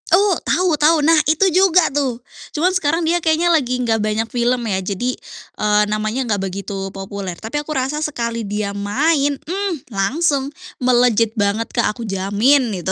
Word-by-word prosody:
Oh, 390 +3 +4
tahu 360 +3 +1
tahu. 320 +2 +5
Nah, 325 0 +5
itu 320 +5 +3
juga 365 -2 +4
tuh. 270 -4 -1 0.4
Cuman 360 +4 +2
sekarang 330 -1 0
dia 345 +2 +1
kayaknya 330 +2 +2
lagi 255 -6 +1
enggak 230 -3 0
banyak 215 +1 0
film 240 0 0
ya. 190 -3 0
Jadi, 205 +7 -2 0.5
eee, 210 0 +3
namanya 215 +5 -2
enggak 205 -4 -1
begitu 195 0 -5
populer. 195 -2 -6
Tapi 230 +7 -4
aku 295 - -8
rasa 270 +4 -2
sekali 235 -6 -3
dia 205 0 -3
main, 280 +8 0
mmm, 385 +6 -3 0.2
langsung, 275 +7 0 0.3
melejit 240 -3 +3
banget 205 +2 0
Kak, 235 -3 0
aku 235 - -7
jamin 210 +6 +1
gitu. 190 - -2
245 Hz, 165 wpm, -19 LUFS, 210-310 Hz, 0.5 s, tahu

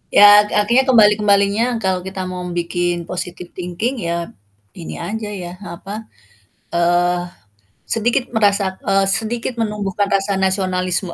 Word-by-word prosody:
Ya 205 0 +8
ak - - -13
akhirnya 250 +5 +2
kembali-kembalinya 210 -2 +4 0.2
kalau 185 -1 +1
kita 190 +1 -6
mau 185 0 -5
bikin 175 0 -2
positive 180 -1 -5
thinking 190 +8 -4
ya 170 -1 -3 0.4
ini 80 -1 -8
aja 215 - -5
ya, 180 -3 -7 0.2
apa, 210 +5 -8 0.7
eee, 175 +1 +1 0.6
sedikit 240 +3 0
merasa 200 -3 +2
eee, 195 -1 +2
sedikit 225 +5 0
menumbuhkan 210 -3 -2
rasa 195 0 +1
nasionalisme 185 -1 0
195 Hz, 125 wpm, -18 LUFS, 180-210 Hz, 0.7 s, Ya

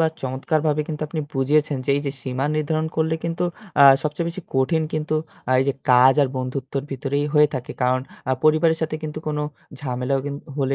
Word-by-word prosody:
বা 160 - +5 0.2
চমৎকারভাবে 150 +4 0
কিন্তু 155 -1 -4
আপনি 155 0 -3
বুঝিয়েছেন 145 +2 +2
যে 140 - 0
এইযে 145 -1 -2
সীমা 130 +1 -2
নির্ধারণ 155 +1 0
করলে 160 0 +1
কিন্তু 170 +1 -1 0.4
আ - - +10 0.2
সবচেয়ে 150 +2 -2
বেশি 175 +1 -6
কঠিন 160 +5 +2
কিন্তু 155 0 -1 0.4
আ - - +4
এইযে 140 0 +1 0.2
কাজ 125 +1 +7
আর 135 - +1
বন্ধুত্বের 130 +2 -3
ভিতরেই 140 +2 -1
হয়ে 150 0 +6
থাকে। 130 -1 -4
কারণ 125 +1 +2 0.3
আ - - +3
পরিবারের 160 +1 +4
সাথে 155 -1 -1
কিন্তু 155 0 -5
কোনো 150 0 -1 0.4
ঝামেলাও 130 0 -1
কিন 140 0 -4 0.2
হলে 135 -1 +1
145 Hz, 185 wpm, -22 LUFS, 135-155 Hz, 0.4 s, আ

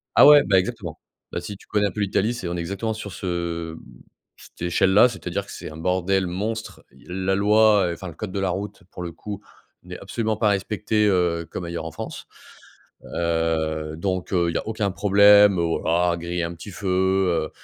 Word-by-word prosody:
ah - - +8
ouais, 145 -1 +9
bah 95 -2 +3
exactement. 90 - -5 0.3
Bah - - -3
si 100 - -7
tu - - -20
connais 105 -1 +1
un - - -4
peu 100 - -7
l'Italie 100 +3 +1
c'est, 115 -7 -5
on 85 0 -3
est - - -3
exactement 100 +6 -3
sur 105 -2 -7
ce 95 - -8 0.5
heu, - - -12 0.6
cette - - -17
échelle 95 +2 +2
là, 105 +5 +7
c'est-à-dire 120 - -4
que - - -12
c'est - - -7
un 80 - -10
bordel 95 +3 0
monstre. 110 +5 -4
Heu, - - -22 0.2
la 95 +1 0
loi, 105 -1 +4
enfin 95 +3 -8
le 85 - -8
code 105 +1 -6
de 100 - -3
la 95 -1 0
route 100 +3 -5
pour 90 - -7
le 85 - -5
coup, 100 +3 -8 0.4
n'est - - -9
absolument 110 -2 -2
pas 105 -1 +2
respecté, 105 +2 0
heu, 85 -4 +1
comme 90 - -5
ailleurs 85 -1 -5
en 80 - -5
France. - - -7 0.8
Heu, 80 -2 -1
donc 90 +2 -3
heu, 85 -1 +2
il - - -6
y - - +1
a - - -7
aucun 110 -2 -1
problème 100 0 +6
au 85 -1 0
voilà 85 +1 +1
griller 85 +1 -3
un 85 +1 -4
petit 85 +5 -10
feu, 100 +2 -7
heu, 95 -3 +1
95 Hz, 215 wpm, -23 LUFS, 85-105 Hz, 0.8 s, ouais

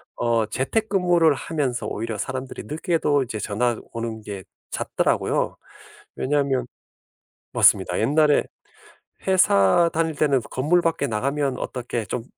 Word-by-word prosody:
어 115 -2 +1
재택근무를 175 - +2
하면서 135 -5 -2
오히려 110 0 -4
사람들이 130 0 -5
늦게도 150 -3 0
이제 115 -3 -5
전화 115 +3 0 0.2
오는 115 -1 -4
게 100 -3 -7 0.3
잦더라고요. - - 0 0.6
왜냐하면 135 -2 0 0.9
맞습니다. - - +4
옛날에 150 0 +3 0.8
회사 170 - +4
다닐 160 -1 0
때는 140 -2 +2
건물 160 +7 +2
밖에 165 -4 0
나가면 135 +4 -1
어떻게 120 -3 -4
좀 120 - -4
135 Hz, 285 characters per minute, -23 LUFS, 115-160 Hz, 0.9 s, 맞습니다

